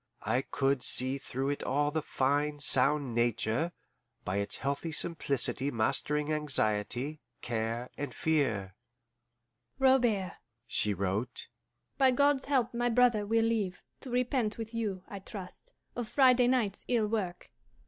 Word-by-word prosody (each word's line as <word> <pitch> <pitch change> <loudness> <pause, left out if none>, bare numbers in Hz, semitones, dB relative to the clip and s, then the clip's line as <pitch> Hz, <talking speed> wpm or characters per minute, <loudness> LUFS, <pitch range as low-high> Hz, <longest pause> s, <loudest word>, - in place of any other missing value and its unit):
I 125 - +1
could 135 -1 0
see 130 +2 +2
through 135 0 -3
it 145 - -4
all 145 +2 0
the 160 +1 -1
fine, 145 +2 0
sound 140 -1 +3
nature, 120 +6 0 0.5
by 95 +2 -1
its 100 0 +1
healthy 140 +4 -2
simplicity 140 -4 0
mastering 150 +5 +1
anxiety, 130 0 0 0.2
care, 115 +1 -2
and 145 -2 -3
fear. 115 -11 0 1.0
"Robert," 240 -8 +2 0.3
she 105 -2 0
wrote, 100 +5 -2 0.5
"by 265 -1 +6
God's 280 +1 +2
help 265 -5 +1
my 240 +1 0
brother 235 -3 +3
will 225 +1 +2
live, 210 -5 -1 0.2
to 265 - -9
repent 245 -2 0
with 225 0 -6
you, 205 -5 -3
I 200 - -7
trust, 190 -1 -10 0.2
of 240 -2 -3
Friday 255 -3 +5
night's 240 -6 0
ill 235 -3 +2
work. 205 -5 -3
155 Hz, 135 wpm, -30 LUFS, -, 1.0 s, by